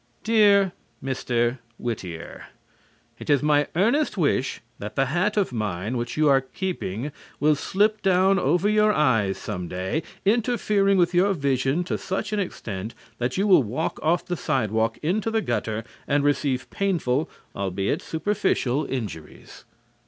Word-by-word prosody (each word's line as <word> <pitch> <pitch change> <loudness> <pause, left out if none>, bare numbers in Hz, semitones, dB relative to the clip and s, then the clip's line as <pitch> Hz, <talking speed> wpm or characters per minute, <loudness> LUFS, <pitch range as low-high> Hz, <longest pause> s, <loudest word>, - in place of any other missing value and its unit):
Dear 205 -4 +4 0.3
Mr. 125 -2 0 0.2
Whittier: 90 -8 -6 0.7
It - - -9
is 145 -1 +3
my 150 -1 +3
earnest 230 - +2
wish 140 -5 +1 0.2
that 105 - -6
the 135 - +2
hat 175 +10 0
of 195 -10 +1
mine 105 0 -2
which 120 +2 -3
you 155 0 +4
are 135 -1 +5
keeping 135 - -4 0.3
will 150 +1 +4
slip 205 +8 +1
down 190 +1 +3
over 175 +7 +2
your 210 0 +4
eyes 115 - +2
some 90 -4 -5
day, 95 - -2 0.2
interfering 210 -3 +2
with 175 0 +3
your 190 +3 +3
vision 140 +2 0
to 180 - -3
such 200 +3 -3
an 210 - 0
extent 110 - -5 0.2
that 120 +5 -1
you 195 - +2
will 190 -7 +6
walk 130 +7 -3
off 165 +3 +1
the 180 - -2
sidewalk 115 - 0
into 200 +8 0
the 225 0 +1
gutter 110 - -2 0.2
and 145 0 +2
receive 140 -3 0
painful, 160 -8 0 0.3
albeit 95 0 -1
superficial, 160 -6 0
injuries. 105 - -7
150 Hz, 145 wpm, -24 LUFS, 120-195 Hz, 0.7 s, will